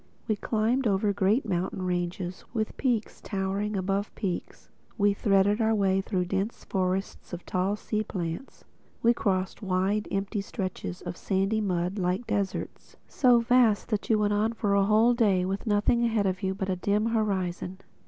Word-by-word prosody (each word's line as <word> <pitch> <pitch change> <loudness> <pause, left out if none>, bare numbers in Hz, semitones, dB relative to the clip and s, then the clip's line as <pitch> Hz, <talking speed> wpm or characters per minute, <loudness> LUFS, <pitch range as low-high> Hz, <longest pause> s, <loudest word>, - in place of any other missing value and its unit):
We 215 - +2
climbed 225 +5 0
over 200 0 +2
great 200 +6 +2
mountain 185 0 -2
ranges, 180 0 -3
with 220 -1 -1
peaks 240 -5 -1
towering 200 +1 -2
above 195 +2 -1
peaks. 185 -4 -5 0.3
We 205 -1 +3
threaded 200 +1 +2
our 220 0 +3
way 195 -2 +2
through 185 -2 -1
dense 195 +5 -2
forests 190 0 -2
of 175 - -6
tall 185 +3 0
sea 215 0 -2
plants. 175 +3 -5 0.4
We 235 +1 +6
crossed 190 -4 -1
wide 195 +2 0
empty 200 +1 -2
stretches 185 -2 -5
of - - -5
sandy 195 +3 0
mud, 180 0 -1
like 185 +5 0
deserts—so 235 +4 0
vast 235 -3 +3
that 215 -3 -2
you 220 - +4
went 205 -1 +1
on 215 +2 +1
for 210 -3 0
a 200 0 +4
whole 220 +4 +4
day 200 -6 +2
with 195 +4 -3
nothing 210 +3 +2
ahead 225 -3 +1
of 185 0 -1
you 190 -1 -1
but 190 0 -3
a 185 - +1
dim 205 +4 +1
horizon. 190 -5 -1
200 Hz, 165 wpm, -27 LUFS, 190-215 Hz, 0.4 s, We